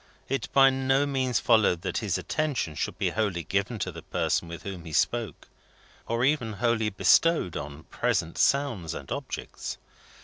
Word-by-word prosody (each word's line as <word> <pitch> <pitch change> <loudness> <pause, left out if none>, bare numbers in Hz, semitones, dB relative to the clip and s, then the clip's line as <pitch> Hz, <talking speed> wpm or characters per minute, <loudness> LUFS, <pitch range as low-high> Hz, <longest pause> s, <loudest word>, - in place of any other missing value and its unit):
It 135 -3 -2
by 135 -1 +6
no 135 +1 +2
means 130 -5 0
followed 100 -5 +3
that - - -1
his - - -1
attention 145 - -2
should - - -3
be - - 0
wholly 100 -6 -1
given 100 +8 -1
to 95 - -3
the - - -9
person 85 - -1
with 85 0 -8
whom 95 -4 -6
he 80 - -8
spoke, 105 +10 0 0.6
or 115 +2 +1
even 130 -6 +1
wholly 110 0 +1
bestowed 155 - +3
on 70 +1 -6
present 100 -3 -1
sounds 130 - +1
and - - -8
objects. - - -5
110 Hz, 165 wpm, -27 LUFS, 90-135 Hz, 0.6 s, by